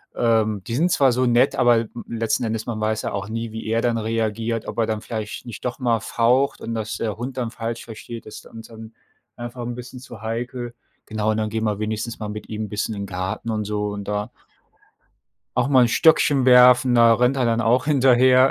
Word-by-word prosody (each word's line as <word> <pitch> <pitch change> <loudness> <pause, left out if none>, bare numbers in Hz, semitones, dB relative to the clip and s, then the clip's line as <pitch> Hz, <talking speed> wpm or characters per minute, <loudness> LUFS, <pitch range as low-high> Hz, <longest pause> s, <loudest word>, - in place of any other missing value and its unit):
ähm, 110 -4 +1
die 115 - -3
sind 170 +6 +2
zwar 135 -2 +4
so 130 +1 +1
nett, 120 +2 +3
aber 120 -2 +4 0.2
letzten 115 +1 -1
Endes 110 0 -3
man 110 -2 -3
weiß 110 0 0
ja - - -3
auch 100 +1 -4
nie, 115 0 -4
wie 110 - -6
er 115 +1 +1
dann 120 -1 +1
reagiert, 115 0 -2
ob - - -6
er 115 - +3
dann 110 -1 -2
vielleicht 110 +1 -6
nicht 120 +1 -8
doch 125 +2 -3
mal 120 -3 +1
faucht 125 +4 +1
und 115 - -4
das 110 -1 -4
der 110 -2 -3
Hund 125 +3 -5
dann 120 -3 -2
falsch 115 0 -5
versteht. 115 +1 -9
Das 110 - -9
ist - - -12
uns 115 0 -11
dann 115 0 -12 0.4
einfach 120 +1 -7
'n 120 - -4
bisschen 125 +1 -9
zu 120 -4 -12
heikel. 120 +2 -4 0.3
Genau, 110 0 -1
und 110 - -1
dann 110 -1 -1
gehen 110 0 -2
wir 105 -1 -1
wenigstens 110 +2 -3
mal 105 -1 -5
mit 105 0 -7
ihm 110 0 -4
'n - - -10
bisschen 105 +1 -3
in 100 - -5
den 100 - -6
Garten 95 +4 -4
und 105 -1 -2
so 105 0 -2
und 100 -1 -6
da 105 0 -3 1.3
auch 125 +1 +2
mal 130 -3 +5
'n 120 - +4
Stöckchen 145 -1 +4
werfen, 125 0 +6
da 115 -1 +6
rennt 125 +3 +2
er 130 - +1
dann 115 0 +1
auch 120 +3 +2
hinterher. 130 -2 +5
115 Hz, 230 wpm, -22 LUFS, 110-125 Hz, 1.3 s, werfen